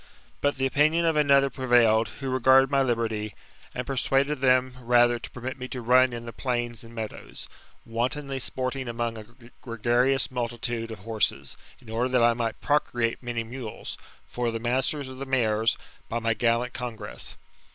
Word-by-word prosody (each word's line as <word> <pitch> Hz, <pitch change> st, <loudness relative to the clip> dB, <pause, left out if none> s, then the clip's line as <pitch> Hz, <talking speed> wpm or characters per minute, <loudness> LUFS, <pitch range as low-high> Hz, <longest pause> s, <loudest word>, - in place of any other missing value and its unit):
But 145 Hz, 0 st, +2 dB
the 135 Hz, -, 0 dB
opinion 155 Hz, +5 st, +3 dB
of 165 Hz, -1 st, +2 dB
another 140 Hz, -2 st, +4 dB
prevailed, 120 Hz, -4 st, +4 dB
who 135 Hz, -2 st, -6 dB
regarded 130 Hz, +1 st, +5 dB
my 140 Hz, -1 st, +3 dB
liberty, 115 Hz, -4 st, -1 dB, 0.4 s
and 125 Hz, -, -3 dB
persuaded 135 Hz, +2 st, +1 dB
them 130 Hz, -1 st, +4 dB
rather 120 Hz, 0 st, +4 dB
to -, -, -8 dB
permit 130 Hz, +2 st, -6 dB
me 130 Hz, -, -5 dB
to 130 Hz, -1 st, -5 dB
run 130 Hz, +2 st, +5 dB
in 120 Hz, 0 st, -6 dB
the 115 Hz, -, -7 dB
plains 120 Hz, -3 st, -2 dB
and 115 Hz, 0 st, -13 dB
meadows, 110 Hz, -2 st, -7 dB, 0.4 s
wantonly 135 Hz, +4 st, -2 dB
sporting 130 Hz, +1 st, -3 dB
among 115 Hz, 0 st, -2 dB
a 110 Hz, -1 st, -9 dB, 0.4 s
gregarious 120 Hz, +3 st, +1 dB
multitude 120 Hz, -1 st, -3 dB
of 110 Hz, -, -6 dB
horses, 110 Hz, -2 st, -1 dB, 0.2 s
in 125 Hz, -, -19 dB
order 120 Hz, +3 st, 0 dB
that 125 Hz, -2 st, +3 dB
I 120 Hz, 0 st, +5 dB
might 115 Hz, -1 st, -3 dB
procreate 120 Hz, -5 st, 0 dB
many 120 Hz, -2 st, -3 dB
mules, 115 Hz, -1 st, -6 dB, 0.3 s
for 120 Hz, -1 st, -2 dB
the 115 Hz, -, -2 dB
masters 130 Hz, +4 st, 0 dB
of 130 Hz, 0 st, -9 dB
the 135 Hz, -, -5 dB
mare$, 110 Hz, -4 st, +1 dB, 0.4 s
by 115 Hz, -, -1 dB
my 115 Hz, -1 st, +1 dB
gallant 120 Hz, +2 st, +1 dB
congress. 120 Hz, -, -6 dB
120 Hz, 170 wpm, -26 LUFS, 115-130 Hz, 0.4 s, regarded